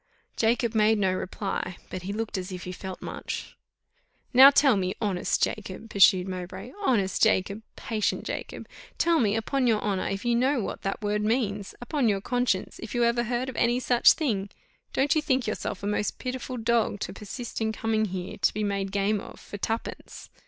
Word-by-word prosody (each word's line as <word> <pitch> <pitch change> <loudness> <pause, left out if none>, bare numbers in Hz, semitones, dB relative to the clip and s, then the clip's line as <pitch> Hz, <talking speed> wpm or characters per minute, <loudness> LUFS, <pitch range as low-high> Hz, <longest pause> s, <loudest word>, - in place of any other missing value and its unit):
Jacob 235 0 +1
made 220 0 +4
no 190 -2 +2
reply, 185 -1 -3
but 185 - -4
he 190 +3 -5
looked 220 +1 -3
as 185 0 -4
if 180 -1 -6
he 180 - -5
felt 185 0 -7
much. - - -6 0.8
"Now 265 +2 +10
tell 280 -3 +5
me, 185 -1 -1
honest 200 -5 0
Jacob," 215 +1 -3
pursued 190 -2 +5
Mowbray, 185 +4 -6
"honest 200 - +1
Jacob, 200 -1 +2
patient 215 -2 -1
Jacob, - - -6 0.3
tell 335 -1 +3
me, 215 -3 +2
upon 250 +4 0
your 220 -3 +3
honour, 200 -3 -1
if 195 +3 -3
you 240 - +2
know 255 +3 +2
what 205 - -4
that 195 +2 -3
word 210 0 0
means 210 -3 -1
upon 245 0 0
your 200 -2 +1
conscience, 245 -3 -1
if 225 - -6
you 240 - +3
ever 235 0 +2
heard 245 +2 -1
of 260 - -6
any 240 +1 +2
such 245 -1 +5
thing 210 -11 -1 0.4
don't 275 +1 +2
you 310 - +2
think 265 -5 +1
yourself 210 -2 -4
a - - -2
most 210 0 -1
pitiful 255 0 -4
dog, 230 -2 +1
to 185 - -3
persist 220 +4 -6
in 220 0 +1
coming 220 0 0
here 185 -2 -5
to - - +3
be 215 - -1
made 200 -1 -1
game 205 +1 +1
of - - -11
for 205 - -9
twopence? 225 +3 -5
215 Hz, 195 wpm, -27 LUFS, 195-240 Hz, 0.8 s, Now